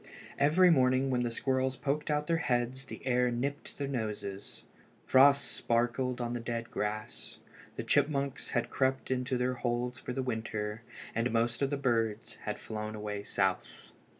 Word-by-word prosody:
Every 165 +6 +6
morning 130 -2 +3
when 125 -1 +2
the 120 - 0
squirrels 130 +2 0
poked 145 +3 -2
out 150 0 +1
their 165 0 +2
heads 130 -2 -1
the - - -9
air 125 -1 +3
nipped 135 +4 -3
their 140 - -2
noses. 105 -6 -4 0.4
Frost 140 +2 +6
sparkled 120 +2 0
on 120 -1 -2
the 120 - -2
dead 115 0 -4
grass. 105 +1 -4 0.4
The - - -3
chipmunks 140 -1 +1
had 120 0 -1
crept 130 0 0
into 125 0 0
their 125 +1 +1
holes 120 0 -2
for 125 - -5
the 130 +1 -2
winter, 110 -3 -3 0.3
and 115 +2 +1
most 115 +2 +1
of 140 - +2
the 145 - -1
birds 115 -5 0
had - - -2
flown 110 0 -5
away 105 -1 -4
south. 95 -2 -2
125 Hz, 165 wpm, -31 LUFS, 115-135 Hz, 0.4 s, Every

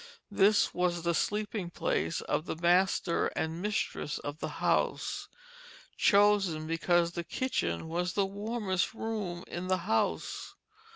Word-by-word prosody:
This 200 +1 +4
was 175 -1 0
the 170 0 +1
sleeping 210 0 -1
place 170 - -1
of 155 - -2
the - - -2
master 175 +1 +2
and 160 +2 -2
mistress 205 -7 -2
of 145 +1 -6
the - - -3
house, - - 0 0.7
chosen 200 -6 +4
because 170 +1 +2
the 170 0 -4
kitchen 160 - -2
was 175 +2 -1
the 200 - +2
warmest 200 -1 -2
room 205 -6 -3
in 175 +1 -5
the 185 0 +2
house. 220 - -1
180 Hz, 130 wpm, -30 LUFS, 170-205 Hz, 0.7 s, This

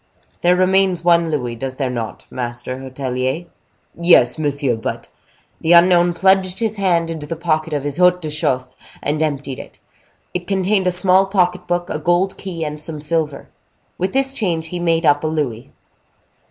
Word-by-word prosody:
"There 175 +1 +4
remains 185 -1 +2
one 170 -1 +4
louis, 125 -6 -2
does 130 +2 -5
there 130 -2 -2
not, 115 -3 -5
master 125 +1 -5
hotelier?" 130 +3 -3 0.5
"Yes, 165 -6 +4
monsieur, 140 -4 0
but—" 110 - -5 0.5
The 165 - +3
unknown 175 0 +5
plunged 190 -1 +3
his 220 -2 -2
hand 170 -4 +1
into 155 -2 -6
the 165 - -3
pocket 160 -1 -1
of 145 -2 -2
his 145 -1 -2
haut 180 0 +4
de 155 -3 -5
chausses, 130 -4 0 0.3
and 150 +2 -1
emptied 145 -3 -2
it. - - -11 0.6
It 180 -1 -4
contained 195 0 +1
a - - +3
small 185 +1 +3
pocket 180 -2 0
book, 175 0 -1
a 155 - -2
gold 175 +4 +1
key, 170 -4 -5
and 150 0 -5
some 155 -1 -4
silver. 150 -2 -2 0.5
With 185 +1 -1
this 270 0 +2
change, 165 -9 -2
he 180 - -4
made 165 -1 +1
up 145 0 +3
a - - 0
louis. 140 -8 -3
165 Hz, 175 wpm, -19 LUFS, 145-180 Hz, 0.6 s, unknown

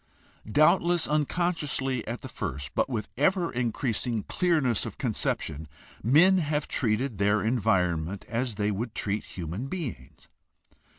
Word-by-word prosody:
Doubtless 170 - +4
unconsciously 150 -5 0
at 120 +2 -4
the - - -5
first, 70 - -5
but - - +1
with 115 -4 -2
ever 175 +4 +2
increasing 120 -2 -1
clearness 155 - +1
of - - -6
conception, 80 0 -2 0.3
men 170 - +5
have 150 -2 -1
treated 115 -1 0
their 105 +1 +3
environment 95 -6 +1
as 120 -1 -2
they 105 +1 0
would 110 +3 -4
treat 105 0 -1
human 90 +8 -5
beings. 125 - -6
120 Hz, 125 wpm, -27 LUFS, 100-150 Hz, 0.3 s, men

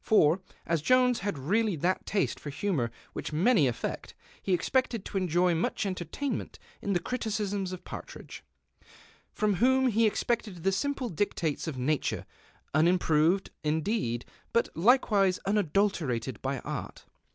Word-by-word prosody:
For, 175 -4 +4 0.2
as 165 -2 0
Jones 250 - +4
had 200 -4 -2
really 200 +8 +1
that 175 +5 -1
taste 200 - 0
for 145 - -7
humour 145 - -1 0.2
Avhieh - - -5
many 175 - +4
affeet, 120 - -4 0.3
he 195 - -3
expected 230 +4 +1
to - - -3
enjoy 180 0 +2
nnieh 165 +5 -1
entertainment 195 - -3 0.2
in 200 - -1
the 175 - +2
criticisms 205 -4 -2
of 185 - -7
Partridge; - - -9 0.9
from 210 -3 0
whom 260 +3 +4
he 225 0 +3
expected 210 -5 -2
the 195 - +3
simple 265 +4 -1
dictates 165 -4 -1
of 150 -5 -4
nature, 140 +3 -1 0.5
unimproved, 165 +2 +3
indeed, 155 - -1 0.3
but 235 - +2
likewise 200 -2 +4
unadul 200 0 +2
terated 125 -6 -3
by 135 +1 -1
art. - - -6
190 Hz, 140 wpm, -29 LUFS, 155-215 Hz, 0.9 s, For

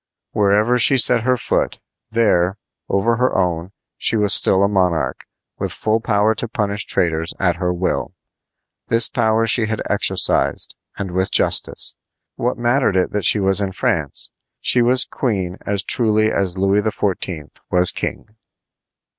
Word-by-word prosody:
Wherever 105 +4 +2
she 135 +3 +5
set 125 -1 +4
her 125 +2 +1
foot, - - -2 0.3
there, 105 -5 +1 0.3
over 115 +4 +1
her 125 -2 0
own, 90 -1 -1 0.3
she 115 - 0
was 105 -1 +3
still 95 +1 +4
a - - +3
monarch, 90 -4 -1 0.3
with - - -2
full 110 +1 -1
power 110 -1 +1
to 115 - -4
punish 105 -2 -2
traitors 80 -1 -1
at 90 -2 +1
her 90 0 -1
will. 90 +1 -3 0.7
This 115 0 +3
power 110 -1 0
she 115 0 +3
had 110 0 -3
exercised, - - +1 0.2
and 95 -2 -5
with 95 +1 0
justice. - - +2 0.4
What 125 +1 -2
mattered 120 -4 +1
it 90 - 0
that 105 -4 -2
she 105 - +4
was 95 0 +3
in 95 -2 -3
France? - - -2 0.3
She 125 - +3
was 125 +2 +4
queen 95 -7 -3
as 100 -2 0
truly 110 -1 +2
as 95 -2 -2
Louis 100 +2 +2
XIV. 95 -7 -3 0.2
was 90 0 +3
king. - - -5
105 Hz, 155 wpm, -19 LUFS, 95-115 Hz, 0.7 s, she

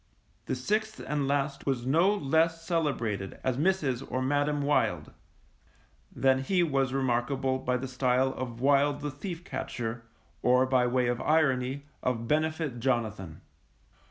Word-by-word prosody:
The - - -1
sixth 215 - -1
and 145 -2 -1
last 140 0 -1
was 125 -3 0
no 165 +9 +4
less 165 -2 +1
celebrated 120 - -1
as 130 -1 0
Mrs. 145 -6 +1
or 130 - 0
Madam 145 +2 0
Wild, 145 +1 +1 1.0
than 130 -1 +2
he 180 +6 +2
was 135 -5 +1
remarkable 130 0 0
by 125 -1 0
the 130 +2 -5
style 130 +1 +1
of 120 -2 -6
Wild 140 +2 +3
the 145 0 -3
Thief 170 +4 -6
catcher, 115 -7 -4 0.4
or, 125 +1 +4
by 130 -1 +2
way 125 0 +1
of 120 0 -1
irony, 140 -3 +1 0.2
of 115 -2 -1
Benefit 155 -3 0
Jonathan. 110 -9 -2
135 Hz, 140 wpm, -29 LUFS, 125-150 Hz, 1.0 s, no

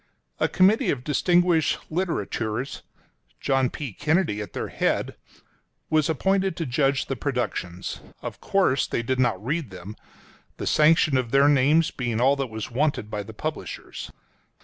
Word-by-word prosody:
A - - +3
committee 195 +4 +4
of 125 -3 -1
distinguished 175 +3 +2
literateurs 135 - -2 0.3
— - - -40
John 135 -2 +1
P. 135 -6 -6
Kennedy 155 - +1
at 100 - -8
their - - -4
head - - -1 0.4
— - - -44
was 155 -1 +3
appointed 190 +3 +1
to 165 - -2
judge 135 +1 +1
the 135 - -3
productions. 120 -10 -3 0.2
Of - - -6
course 185 -9 +2
they 120 - -2
did 130 +2 -1
not 115 -5 +1
read 150 -1 -1
them 95 +3 -9 0.3
— - - -29
the - - -4
sanction 155 -2 +4
of 125 -2 -1
their 140 +3 +5
names 145 +3 +4
being 120 -3 -2
all 135 +3 +4
that 135 -2 -2
was 110 0 -6
wanted 130 -4 0
by 105 - -2
the 100 - -10
publishers. - - -6
135 Hz, 165 wpm, -25 LUFS, 115-160 Hz, 0.4 s, their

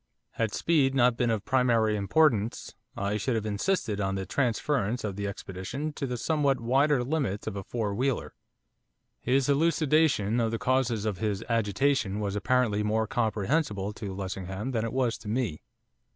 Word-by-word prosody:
Had 110 -2 -1
speed 140 -5 +2
not 125 -2 +4
been 120 0 +1
of 110 -3 -1
primary 115 -4 +2
importance 110 +1 +1 0.2
I 100 +1 -1
should 120 +3 -1
have 110 -1 -2
insisted 105 - -1
on 95 0 -1
the 95 0 -3
transference 125 -2 0
of 100 -3 -3
the 100 0 -3
expedition 100 +10 -5
to 140 - -3
the 125 -1 -3
somewhat 140 -1 +1
wider 135 +3 +2
limits 130 -8 -2
of 110 - -4
a 100 - -3
four 110 -3 -2
wheeler. 130 +4 -1 0.9
His 130 +1 +1
elucidation 145 -6 +2
of 115 -1 +1
the 115 - -2
causes 120 -4 0
of 105 -4 -2
his 105 0 -1
agitation 115 -1 +1
was 100 -1 -2
apparently 110 -1 +1
more 110 +1 +1
comprehensible 110 -1 -1
to 105 -2 -6
Lessingham 95 +4 -4
than 115 -3 -1
it 115 - -3
was 125 -3 0
to - - -11
me. 110 -8 -1
115 Hz, 165 wpm, -28 LUFS, 105-135 Hz, 0.9 s, not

